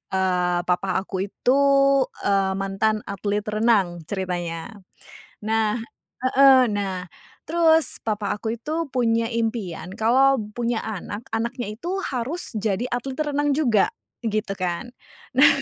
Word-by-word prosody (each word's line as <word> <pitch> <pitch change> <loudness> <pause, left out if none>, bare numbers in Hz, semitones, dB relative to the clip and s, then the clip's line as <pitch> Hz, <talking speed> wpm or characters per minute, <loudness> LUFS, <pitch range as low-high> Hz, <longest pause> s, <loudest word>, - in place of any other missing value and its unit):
eee, 180 -2 +1
papa 180 +2 0
aku 195 0 -3
itu, 250 +6 +1 0.7
eee, 195 -1 +2
mantan 195 +2 0
atlet 200 +1 -2
renang 210 -5 +1
ceritanya. 175 -2 -3 0.7
Nah 220 0 +1 0.5
heeh 260 -1 +6
nah 195 -3 -2 0.4
terus 325 0 +3
papa 210 -2 -2
aku 220 +1 -3
itu 310 +8 -3
punya 230 -3 +1
impian 225 -7 -3
kalau 260 +5 +3 0.2
punya 235 -1 0
anak, 210 +1 -5
anaknya 235 0 -3
itu 360 - -3
harus 270 +2 -3
jadi 215 +3 -1
atlet 260 +2 -3
renang 290 -1 +1
juga 255 - +2 0.3
gitu 215 -3 -1
kan. 185 +6 -3 0.4
Nah 265 +3 +7
220 Hz, 120 wpm, -23 LUFS, 195-250 Hz, 0.7 s, Nah